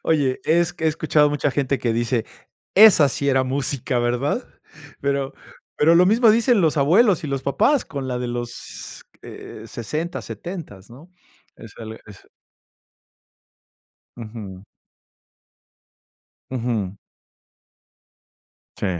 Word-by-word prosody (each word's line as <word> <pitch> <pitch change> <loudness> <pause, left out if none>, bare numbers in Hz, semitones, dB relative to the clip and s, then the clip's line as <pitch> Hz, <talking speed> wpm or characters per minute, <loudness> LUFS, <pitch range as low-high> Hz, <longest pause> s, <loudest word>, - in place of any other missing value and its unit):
Oye, 140 -5 +1
es 170 +1 +2
que 160 - -6
he - - +4
escuchado 155 -1 +2
mucha 145 0 0
gente 135 -1 -1
que 115 -2 -1
dice: 120 0 0 0.5
"Esa 195 -8 +8
sí 140 +2 -2
era 130 -1 +3
música, 130 -1 -1
¿verdad?" 125 - -1 0.5
Pero 140 -1 -1 0.4
pero 165 +3 +4
lo 180 +2 +6
mismo 225 +2 +5
dicen 230 -1 +3
los 160 -1 +2
abuelos 185 - +4
y - - -4
los 135 -1 -3
papás 275 - +2
con 135 -3 -6
la 125 - -2
de 125 -1 -3
los, 120 0 -7 0.2
eh, 110 - -10
60, 155 +10 -4
70s, 160 - -8
¿no? 145 +10 -15 0.5
Es 115 -1 -13
al 110 -1 -8
es 105 -3 -15 1.9
Ujú. 105 -4 -9 1.9
Ujú. 115 -6 -2 1.8
Sí, - - -2
140 Hz, 120 wpm, -22 LUFS, 120-165 Hz, 1.9 s, Esa